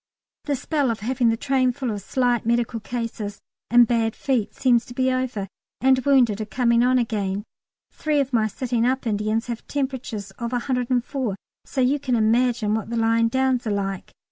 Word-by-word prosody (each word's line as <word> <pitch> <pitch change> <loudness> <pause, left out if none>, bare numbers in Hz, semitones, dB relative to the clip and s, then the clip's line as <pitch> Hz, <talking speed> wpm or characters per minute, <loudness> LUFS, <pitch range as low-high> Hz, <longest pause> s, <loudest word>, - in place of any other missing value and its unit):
The 290 - 0
spell 285 0 0
of 225 -3 -2
having 245 +1 +1
the 225 - +1
train 260 -1 +2
full 255 -2 -3
of 205 -1 -4
slight 245 +2 0
medical 235 0 0
cases 225 -3 -5 0.3
and 240 +1 +7
bad 225 -1 0
feet 250 -7 -1
seems 245 -3 +3
to 245 - -10
be 260 0 +2
over, 255 -6 -2 0.3
and 260 0 +4
wounded 245 -7 +3
are - - -2
coming 235 +2 +2
on 255 +1 +4
again. 205 -4 -1 0.5
Three 305 -2 0
of 275 -1 -1
my 220 -2 +3
sitting 235 +2 -1
up 260 +2 0
Indians 215 +1 0
have 235 -2 -6
temperatures 255 -8 -3
of 235 +1 -3
104, 250 -2 -1 0.3
so 265 - -2
you 265 +3 +2
can 255 -3 0
imagine 230 -1 +2
what 220 -1 -2
the 235 - -2
lying 230 0 +3
downs 260 0 +1
are - - 0
like. 195 -2 -3
240 Hz, 185 wpm, -23 LUFS, 220-260 Hz, 0.5 s, and